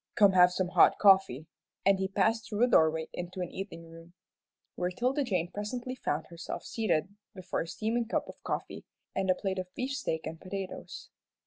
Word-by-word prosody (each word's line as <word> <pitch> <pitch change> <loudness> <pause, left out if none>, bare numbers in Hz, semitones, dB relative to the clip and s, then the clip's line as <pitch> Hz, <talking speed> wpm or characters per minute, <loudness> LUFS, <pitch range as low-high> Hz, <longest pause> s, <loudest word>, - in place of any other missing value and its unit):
"Come 205 -4 +6
have 180 -1 +6
some 180 0 -1
hot - - +5
coffee," 190 -8 +5 0.4
and 195 0 +4
he 190 - 0
passed 220 +3 +1
through 210 +2 +1
a - - +6
doorway 160 -7 +3
into 175 +1 -6
an 175 - -4
eating 185 -4 -7
room, 165 +1 -14 0.6
where 180 0 -1
'Tilda 255 +9 0
Jane 180 -8 -1
presently 240 +5 -4
found 160 - -2
herself 170 0 -6
seated 195 -4 -1 0.2
before 185 -2 -3
a 165 - -5
steaming 225 +6 -1
cup - - -1
of - - -11
coffee, - - -4 0.3
and 190 0 0
a 185 - +5
plate 190 -1 -2
of 180 0 -6
beefsteak 260 - -2
and 160 +1 -6
potatoes. 190 0 -7
190 Hz, 185 wpm, -30 LUFS, 175-215 Hz, 0.6 s, Come